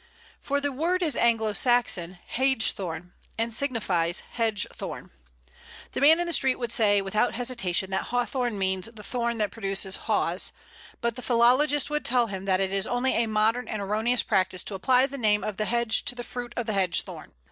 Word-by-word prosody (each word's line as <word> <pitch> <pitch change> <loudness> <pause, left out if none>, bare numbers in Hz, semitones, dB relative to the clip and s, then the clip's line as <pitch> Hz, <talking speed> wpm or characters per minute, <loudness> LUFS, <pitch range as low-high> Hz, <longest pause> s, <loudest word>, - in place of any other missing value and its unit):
For 285 0 -1
the 285 0 -2
word 345 +7 0
is 310 -4 +1
Anglo 225 -2 +2
Saxon 205 -7 +2 0.2
(hægthorn), 200 -10 0 0.3
and 230 +1 -1
signifies 210 -10 0
hedge 225 -4 0
thorn. - - -7 0.8
The - - -4
man 315 +4 +6
in 350 - 0
the 340 - 0
street 265 -4 +2
would 240 -3 -3
say 205 -3 +3
without 210 +5 0
hesitation 210 -7 -1
that 190 - -1
Hawthorn 245 -2 -1
means 190 +1 -1
the 215 -2 -12
thorn 235 0 -2
that 210 -3 -1
produces 195 -2 0
Haws, - - 0 0.5
but 235 -1 -1
the - - -6
philologist 255 +5 +3
would 300 0 -1
tell 245 -1 +2
him 195 -3 -6
that 190 -1 +2
it 190 -1 0
is 195 -1 0
only 245 +2 0
a 230 0 +1
modern 220 +3 +1
and 215 - -4
erroneous 215 +4 0
practice 185 -1 0
to - - -5
apply 255 +7 +3
the 275 0 -7
name 210 -2 +2
of 210 -3 -4
the 215 - -1
hedge 235 -1 0
to 245 - -2
the 240 - -6
fruit 245 0 -5
of 240 - -1
the 215 - -2
hedge 190 -3 +1
thorn. - - -11
230 Hz, 195 wpm, -26 LUFS, 195-250 Hz, 0.8 s, man